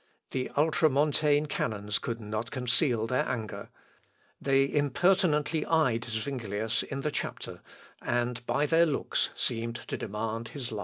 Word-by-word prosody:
The 130 -1 -2
Ultra 155 +1 +4
Montane 150 +1 +3
canons 105 -7 -2
could 115 -1 -4
not 110 +1 -4
conceal 125 -2 +2
their 125 +2 0
anger. 110 -5 -4 0.7
They 135 0 +4
impertinently 155 +1 +2
eyed 125 -8 +2
Zuinglius 110 -2 -2
in 135 -1 -4
the 150 - -1
chapter, - - -5 0.4
and 120 0 -1
by 145 - +2
their 165 +2 +4
looks 145 - 0
seemed 115 0 -2
to 120 - -5
demand 110 +2 -3
his 125 -3 -5
life. 110 - -4
125 Hz, 140 wpm, -29 LUFS, 115-150 Hz, 0.7 s, Ultra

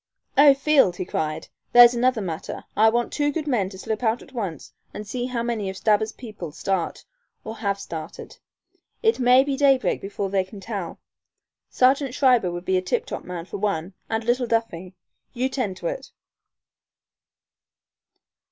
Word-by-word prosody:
"Oh, 285 -1 +7
Field," 275 - +3
he 180 - -4
cried, 155 -3 -3 0.3
"there's 240 0 +9
another 245 -1 +1
matter. 170 -1 -5
I 220 +1 +5
want 240 +1 -1
two 290 -1 +1
good 310 +1 -3
men 230 -10 0
to 190 - -11
slip 215 +3 -4
out 230 0 0
at 275 - -18
once 195 - -5 0.2
and 210 - -6
see 245 +3 -3
how 240 -2 -2
many 225 -5 -2
of 190 - -6
Stabber's 215 +1 +2
people 210 -9 -9
start 175 +2 -3 0.4
or 220 +1 -7
have 200 -2 -1
started. 160 -5 -8 0.6
It 450 -7 +3
may 250 +1 +6
be 280 -1 -2
daybreak 270 -2 +2
before 195 0 -4
they 195 -1 +2
can 195 +2 -12
tell. 195 -4 -6 0.7
Sergeant 265 0 +2
Schreiber 250 -10 +3
would 175 +1 -6
be 190 0 +2
a - - +1
tiptop 180 - -3
man 175 -2 -6
for - - -7
one 195 -3 -2 0.2
and 225 0 -1
little 240 +2 +1
Duffy. 190 -6 -2 0.4
You 255 +1 -1
'tend 225 -9 -3
to - - -10
it." - - -4
220 Hz, 170 wpm, -24 LUFS, 190-255 Hz, 0.7 s, there's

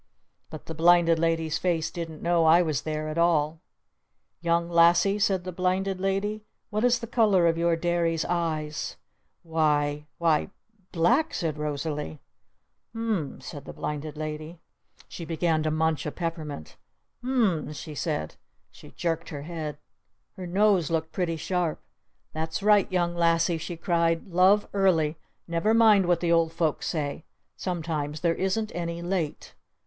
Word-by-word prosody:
But 155 - -9
the 160 - -6
Blinded 170 0 +4
Lady's 165 -1 0
face 170 -3 0
didn't 165 -3 -6
know 170 -1 +3
I 165 +3 +6
was 155 -7 -1
there 155 +1 -3
at 155 +2 -3
all. 160 -2 +2 0.8
"Young 170 0 +1
Lassie," 170 +4 +4
said 190 -3 +1
the 185 - -5
Blinded 185 +2 -1
Lady. 200 +2 -1 0.3
"What 215 +1 -1
is 245 -1 +3
the - - -4
color 215 -6 +3
of 165 -1 +3
your 170 0 +2
Derry's 170 -1 0
eyes?" 155 -3 -2 0.5
"Why 150 -2 0
why 165 -1 +2 0.4
black!" 240 - +2
said 155 -4 -2
Rosalee. 150 +1 -3 0.8
"U - - -5
m 210 -11 -2
mmm," - - -17
said 140 +2 -8
the - - -8
Blinded 150 0 -5
Lady. 155 +1 -5
"Black?" 175 - -27
She 170 - -8
began 165 -1 0
to 155 - 0
munch 155 0 0
a - - -2
peppermint. 160 - -5 0.4
"U 250 - -5
m 260 -2 +3 0.2
m 150 - -7
m," 150 - -7
she 150 +1 -8
said. 150 - -3 0.3
She - - -14
jerked 165 -1 -3
her 145 -2 -6
head. 155 -2 -5 0.6
Her 185 -2 -7
nose 190 -2 +3
looked 160 -1 -1
pretty 170 -3 -1
sharp. 175 -1 -1 0.5
"That's 160 +3 -3
right, 205 -2 +4
Young 175 -2 +1
Lassie!" 170 0 +2
she 170 +2 -6
cried. 170 -1 +1
"Love 190 +4 +4
early! 170 -6 +2 0.3
Never 170 +6 +1
mind 215 -5 +5
what 175 -1 +2
the 170 -1 +1
old 165 -1 +3
folks 165 -3 -1
say! 150 -1 -3 0.3
Sometimes 155 -4 -3
there 170 -1 +2
isn't 190 +5 -1
any 170 0 -4
late! 175 -4 -3
170 Hz, 160 wpm, -26 LUFS, 155-180 Hz, 0.8 s, I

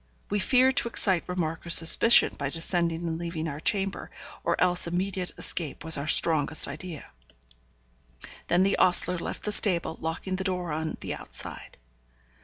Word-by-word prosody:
We 205 - 0
feared 260 +5 +2
to - - +1
excite 190 -6 0
remark 165 -3 -4
or 170 - -10
suspicion 170 +8 +6
by 140 -1 -4
descending 170 +1 -3
and 165 0 -4
leaving 165 -2 -5
our 145 -1 -7
chamber, 195 +3 -2 0.3
or - - -2
else 180 -1 +3
immediate 180 +1 -4
escape 155 -5 -3
was 160 - +5
our 140 +2 -5
strongest 155 -1 +3
idea. 155 +2 -8 1.4
Then 175 +2 +2
the 195 - +1
ostler 180 -1 +3
left - - -7
the 210 - -3
stable, 175 -6 0
locking 165 +4 -5
the 190 - -4
door 180 -3 -2
on 155 +1 -4
the - - -5
outside. - - -3
170 Hz, 160 wpm, -26 LUFS, 160-185 Hz, 1.4 s, suspicion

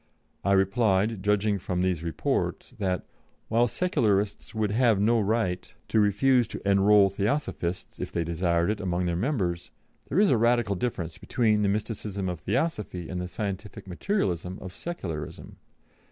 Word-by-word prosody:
I 100 - +3
replied, 100 +1 +2
judging 105 0 +1
from 90 0 -2
these 90 -4 0
reports, 85 -2 -2
that 90 -2 -1 0.4
"while 115 +2 +3
Secularists 105 - 0
would 110 -2 0
have 115 -2 +3
no 115 +3 +3
right 100 -4 0 0.2
to 110 - +3
refuse 120 +4 +3
to 105 - -7
enrol 100 0 +5
Theosophists, 100 - -2
if - - -4
they 85 - -1
desired 85 +2 +1
it, 105 - -3
among 90 -1 -1
their 85 -1 0
members, 90 - -1 0.4
there 160 - +2
is 205 -1 +5
a 120 - +3
radical 115 -3 +3
difference 90 -6 -3
between 110 -4 +1
the 100 - +2
mysticism 100 -2 -2
of 90 -2 -4
Theosophy 105 - -2
and 90 -1 -3
the 90 - -4
scientific 100 +2 -5
materialism 90 - -2
of 95 -1 -8
Secularism. 85 - -6
100 Hz, 155 wpm, -27 LUFS, 90-110 Hz, 0.4 s, enrol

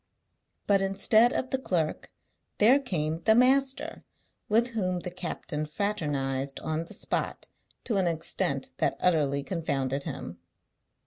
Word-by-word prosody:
But 200 -1 +3
instead 205 +5 +4
of 260 - -2
the 265 - +1
clerk 170 -10 -2 0.5
there 245 +7 +6
came 165 - -2
the 220 +6 +4
master, 265 +2 +2 0.5
with 230 +3 +3
whom 185 -6 -1
the 180 - -5
captain 170 -3 -4
fraternised 140 -8 -2
on 160 +1 -2
the - - -10
spot - - -2 0.4
to 220 - 0
an 190 -2 +2
extent 155 -4 -1
that - - 0
utterly 145 -6 +2
confounded 140 -5 -2
him. 90 - -6
175 Hz, 130 wpm, -28 LUFS, 150-215 Hz, 0.5 s, there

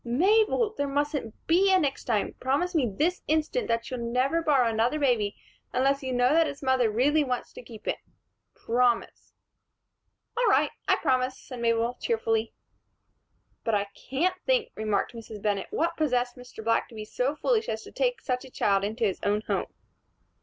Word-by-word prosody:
"Mabel! 420 - +3
There 285 - -1
mustn't 285 -5 -2
be 375 +4 +4
a 375 - +6
next 285 -5 -1
time. 220 -4 0
Promise 285 +8 0
me 275 -8 +2
this 325 - 0
instant 315 +10 0
that 230 +1 -1
you'll 255 - -3
never 255 +7 +1
borrow 280 -6 +3
another 230 +5 +1
baby 240 -8 +1 0.4
unless 275 +2 +2
you 260 -1 -3
know 250 +2 +3
that 325 0 +4
its 280 0 -7
mother 260 -3 +3
really 285 +8 +3
wants 250 -3 -3
to - - -9
keep 230 -3 -13
it. - - -1 0.6
Promise." 240 0 0 1.0
"All 485 -1 +2
right, 410 - +3 0.2
I - - +5
promise," 255 0 0
said 255 -3 -10
Mabel, 230 +1 0
cheerfully. 225 -1 0 1.1
"But 225 - +1
I 200 0 -1
can't 365 +8 -2
think," - - +1
remarked 215 -1 -1
Mrs. 225 -2 -9
Bennett, 200 -1 -1
"what 335 +1 0
possessed 250 -5 0
Mr. 245 -3 -11
Black 230 +1 +1
to 230 - -13
be 215 -1 -6
so 255 +6 -1
foolish 450 +6 +1
as 220 0 -3
to - - -12
take - - 0
such 250 -1 -2
a 265 - -11
child 195 -5 +1
into 220 +4 -2
his 195 -4 0
own 205 +1 +1
home." - - -2
255 Hz, 180 wpm, -27 LUFS, 230-305 Hz, 1.1 s, a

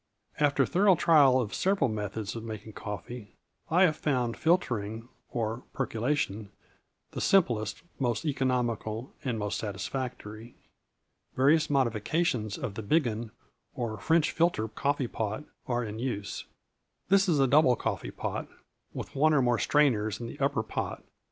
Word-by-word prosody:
After 145 -2 +3
thorough 190 +1 +4
trial 145 -7 +5
of 110 -5 -2
several 190 -7 +2
methods 105 -1 -4
of 115 - -5
making 110 -1 -7
coffee, 105 +2 -7 0.3
I 175 +4 +5
have 160 -4 +4
found 125 -6 0
filtering 115 - 0 0.2
(or 115 0 -2
percolation) 115 -4 -1 0.6
the - - -5
simplest, 115 - +2 0.2
most 125 +2 0
economical, 125 -4 -1
and 125 -5 -1
most 105 -1 -2
satisfactory. 110 +2 -5 0.8
Various 150 +4 +4
modifications 120 -2 0
of 120 -5 -4
the 110 - -5
biggin, 115 -2 0 0.5
or 110 -3 -3
French 165 +4 +2
filter 165 -10 +1
coffee 140 +4 -1
pot, 110 +4 -3 0.2
are 120 -1 0
in 110 0 -6
use. 115 -5 -4 0.6
This 195 0 +4
is 160 - +3
a 135 - +5
double 135 -1 +5
coffee - - -3
pot, - - -4 0.5
with - - -6
one 155 +3 +4
or 140 - +4
more 120 -1 +2
strainers 110 -8 +2
in 120 - -5
the 115 - -8
upper - - +1
pot. - - -4
120 Hz, 140 wpm, -29 LUFS, 110-145 Hz, 0.8 s, trial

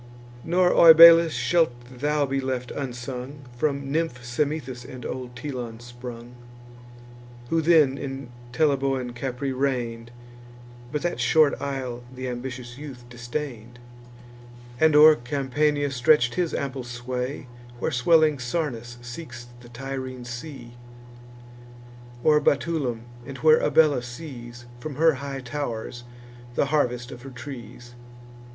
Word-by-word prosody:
Nor 180 +2 +3
Oebalus, 165 0 +9
shalt 165 -7 +2
thou 145 +4 0
be 135 0 -1
left 130 -2 -3
unsung, 130 +1 -6
From 140 +1 -1
nymph 150 -6 -1
Semethis 130 -1 -2
and 130 -2 -10
old 125 -1 -6
Telon 120 -4 -6
sprung, 120 0 -10 1.2
Who 165 0 +3
then 150 -5 +4
in 135 -1 -6 0.2
Teleboan 135 -3 0
Capri 130 +2 -3
reign'd; 120 -4 -2 0.8
But 150 +1 -3
that 175 -7 -2
short 145 +5 +4
isle 130 -4 -4
th' 130 - -10
ambitious 125 0 -6
youth 130 -5 -9
disdain'd, 120 -1 -6 1.0
And 155 -1 +4
o'er 155 +1 +9
Campania 145 +3 0
stretch'd 120 -1 +3
his 175 -3 -1
ample 135 -2 -3
sway, 125 +2 -5 0.3
Where 130 - -2
swelling 155 +3 +4
Sarnus 120 -3 -3
seeks 120 -2 -8
the 120 0 -14
Tyrrhene 130 0 -6
sea; 120 0 -8 1.5
O'er 150 -1 +6
Batulum, 145 -5 0 0.2
and 135 +1 -8
where 155 +3 +5
Abella 150 -3 +3
sees, 120 -2 -9
From 145 +2 -6
her 160 +2 +4
high 135 -1 -5
tow'rs, 120 -3 -5 0.5
the - - +2
harvest 125 -4 0
of 125 -2 -10
her 135 - -9
trees. 120 -2 -10
130 Hz, 120 wpm, -25 LUFS, 120-150 Hz, 1.5 s, Oebalus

